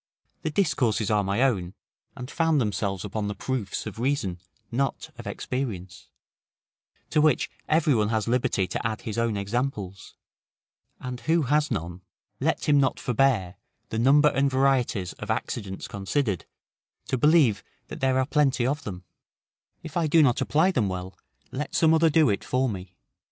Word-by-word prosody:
The 160 Hz, -, -2 dB
discourses 130 Hz, -, +1 dB
are 105 Hz, -1 st, +3 dB
my 100 Hz, +6 st, +1 dB
own, 95 Hz, -9 st, 0 dB, 0.4 s
and 125 Hz, +3 st, -7 dB
found 165 Hz, -3 st, +2 dB
themselves 100 Hz, -4 st, -1 dB
upon 105 Hz, +1 st, -3 dB
the 105 Hz, -, -3 dB
proofs 125 Hz, -5 st, -3 dB
of -, -, -7 dB
reason, 120 Hz, -9 st, -1 dB, 0.3 s
not 135 Hz, +3 st, -2 dB
of -, -, -8 dB
experience; 95 Hz, -, -5 dB, 1.0 s
to 155 Hz, -, +3 dB
which 155 Hz, 0 st, +2 dB, 0.2 s
every 155 Hz, -1 st, +3 dB
one 105 Hz, -3 st, +1 dB
has 110 Hz, -1 st, 0 dB
liberty 115 Hz, -5 st, +1 dB
to 90 Hz, -, -4 dB
add 110 Hz, -1 st, -4 dB
his 110 Hz, +1 st, -4 dB
own 115 Hz, -3 st, 0 dB
examples; 100 Hz, -2 st, -3 dB, 0.8 s
and 125 Hz, -1 st, -6 dB
who 160 Hz, +6 st, +1 dB
has 150 Hz, +3 st, +2 dB
none, 85 Hz, +2 st, -4 dB, 0.4 s
let 160 Hz, +4 st, 0 dB
him 145 Hz, -1 st, +5 dB
not 135 Hz, -2 st, +1 dB
forbear, 120 Hz, -8 st, +1 dB, 0.3 s
the 110 Hz, -, -2 dB
number 145 Hz, +5 st, +5 dB
and 140 Hz, -1 st, +1 dB
varieties 130 Hz, -8 st, +1 dB
of 105 Hz, -, -7 dB
accidents 105 Hz, -3 st, -3 dB
considered, 100 Hz, -, -2 dB, 0.6 s
to -, -, -1 dB
believe 140 Hz, -, +4 dB, 0.3 s
that -, -, -7 dB
there 130 Hz, -1 st, +2 dB
are 130 Hz, -, +2 dB
plenty 135 Hz, -4 st, +2 dB
of 145 Hz, +4 st, -1 dB
them; 90 Hz, -3 st, -7 dB, 0.8 s
if 160 Hz, -1 st, -9 dB
I 170 Hz, -2 st, +1 dB
do 155 Hz, +1 st, +5 dB
not 125 Hz, -4 st, +2 dB
apply 160 Hz, +6 st, +3 dB
them 110 Hz, -, 0 dB
well, 90 Hz, 0 st, -5 dB, 0.4 s
let 145 Hz, +3 st, -4 dB
some 160 Hz, -1 st, +4 dB
other 160 Hz, 0 st, +4 dB
do 155 Hz, 0 st, +4 dB
it 100 Hz, -, -2 dB
for 130 Hz, +1 st, 0 dB
me. 95 Hz, -4 st, -6 dB
125 Hz, 165 wpm, -26 LUFS, 100-145 Hz, 1.0 s, him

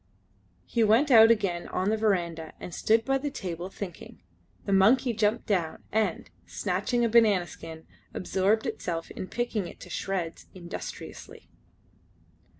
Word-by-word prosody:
He 235 Hz, -, +1 dB
went 230 Hz, +7 st, +4 dB
out 225 Hz, -2 st, +9 dB
again 195 Hz, -6 st, +1 dB
on 190 Hz, +3 st, -1 dB
the -, -, +2 dB
verandah 170 Hz, -7 st, -1 dB
and 175 Hz, -, -8 dB
stood 225 Hz, +5 st, +2 dB
by 270 Hz, 0 st, +1 dB
the 290 Hz, +2 st, -2 dB
table 180 Hz, -, -5 dB
thinking. 185 Hz, -, -9 dB, 0.4 s
The 200 Hz, -, 0 dB
monkey 235 Hz, +6 st, +4 dB
jumped 220 Hz, +1 st, +1 dB
down, 175 Hz, -6 st, -1 dB
and, 215 Hz, -5 st, 0 dB, 0.2 s
snatching 210 Hz, +6 st, -1 dB
a -, -, +3 dB
banana 215 Hz, -5 st, +4 dB
skin, 160 Hz, -1 st, -10 dB, 0.3 s
absorbed 195 Hz, +4 st, 0 dB
itself 165 Hz, -1 st, -4 dB
in 185 Hz, -, -6 dB
picking 230 Hz, -5 st, -2 dB
it -, -, -12 dB
to -, -, -10 dB
shreds 180 Hz, -4 st, -3 dB
industriously. 175 Hz, -1 st, -9 dB
200 Hz, 145 wpm, -28 LUFS, 175-225 Hz, 0.4 s, out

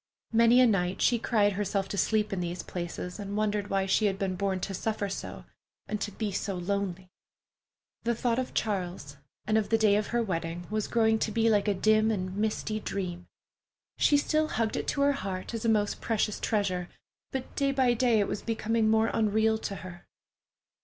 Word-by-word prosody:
Many 230 Hz, +2 st, +6 dB
a -, -, +7 dB
night 190 Hz, -4 st, +1 dB
she 240 Hz, -, +3 dB
cried 210 Hz, -3 st, +2 dB
herself 195 Hz, 0 st, -1 dB
to -, -, -3 dB
sleep 210 Hz, +1 st, +1 dB
in 190 Hz, -, -2 dB
these 175 Hz, 0 st, -3 dB
places, 180 Hz, +2 st, -5 dB
and 200 Hz, 0 st, -4 dB
wondered 210 Hz, -1 st, 0 dB
why 195 Hz, -1 st, +1 dB
she 205 Hz, +3 st, +2 dB
had 195 Hz, -1 st, -1 dB
been 195 Hz, -1 st, -1 dB
born 190 Hz, 0 st, -1 dB
to 195 Hz, -, -3 dB
suffer 210 Hz, +1 st, -2 dB
so, 195 Hz, -, -6 dB, 0.4 s
and 210 Hz, 0 st, -4 dB
to -, -, -1 dB
be 210 Hz, +1 st, -3 dB
so 195 Hz, +1 st, -2 dB
lonely. 185 Hz, 0 st, -3 dB, 0.9 s
The 235 Hz, 0 st, 0 dB
thought 235 Hz, +1 st, 0 dB
of 255 Hz, -, -4 dB
Charles, 180 Hz, -9 st, -2 dB, 0.3 s
and 215 Hz, +1 st, +3 dB
of 205 Hz, -2 st, -3 dB
the 225 Hz, -, +4 dB
day 215 Hz, -2 st, +4 dB
of 210 Hz, -, -1 dB
her 240 Hz, 0 st, 0 dB
wedding, 170 Hz, -3 st, -3 dB
was 215 Hz, -1 st, -1 dB
growing 220 Hz, -1 st, +2 dB
to 215 Hz, -, -1 dB
be 225 Hz, +1 st, +2 dB
like 205 Hz, -1 st, +2 dB
a 205 Hz, -, +2 dB
dim 215 Hz, +3 st, +3 dB
and 185 Hz, -3 st, -2 dB
misty 215 Hz, +1 st, -1 dB
dream. 180 Hz, -4 st, -4 dB, 0.7 s
She 290 Hz, -, +5 dB
still 310 Hz, +2 st, +1 dB
hugged 225 Hz, -6 st, -1 dB
it -, -, -3 dB
to 280 Hz, -, 0 dB
her 285 Hz, 0 st, +5 dB
heart, 195 Hz, -8 st, -4 dB
as 230 Hz, 0 st, -4 dB
a -, -, +3 dB
most 210 Hz, -2 st, +1 dB
precious 215 Hz, -2 st, 0 dB
treasure, 185 Hz, -5 st, -1 dB, 0.4 s
but 265 Hz, -1 st, -5 dB
day 275 Hz, -1 st, +1 dB
by 260 Hz, -3 st, +3 dB
day 240 Hz, -2 st, +3 dB
it 205 Hz, -, +1 dB
was -, -, -3 dB
becoming 225 Hz, -1 st, 0 dB
more 220 Hz, +1 st, +3 dB
unreal 220 Hz, 0 st, +2 dB
to 200 Hz, -, -4 dB
her. 175 Hz, -1 st, -10 dB
210 Hz, 200 wpm, -29 LUFS, 195-225 Hz, 0.9 s, a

